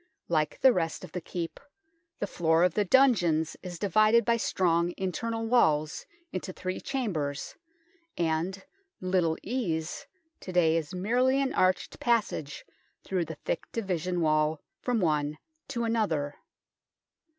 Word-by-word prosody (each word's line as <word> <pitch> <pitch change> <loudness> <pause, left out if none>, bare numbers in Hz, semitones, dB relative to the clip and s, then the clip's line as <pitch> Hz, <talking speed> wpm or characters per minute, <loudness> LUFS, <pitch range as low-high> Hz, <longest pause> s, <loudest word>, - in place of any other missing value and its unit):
Like 155 -3 0
the 260 -2 +7
rest 165 -2 -2
of 180 - -9
the 180 - -4
Keep, 165 0 -5 0.6
the - - -1
floor 165 -3 +2
of 180 -2 +3
the 210 - +2
dungeons 180 - +3
is 180 -2 -7
divided 215 +4 +4
by 235 - +3
strong 175 -5 +1
internal 225 +5 -2
walls 155 -11 +2 0.2
into 185 +1 -4
three 185 0 -4
chambers, 160 - -2 0.6
and 170 +4 -1 0.2
" 385 -1 -50
Little 180 -3 +1
Ease 195 - -2 0.2
" 320 0 -48
to 185 - -7
day 165 -3 +4
is 165 0 -2
merely 250 +8 +2
an 275 -1 0
arched 185 0 +1
passage 215 -11 0 0.4
through 185 -3 -1
the 160 - -7
thick - - -3
division 180 -5 -1
wall 155 0 +2 0.2
from 245 -4 0
one 150 -3 +1 0.3
to 235 -2 -2
another. 195 -11 0
180 Hz, 140 wpm, -29 LUFS, 160-225 Hz, 0.6 s, the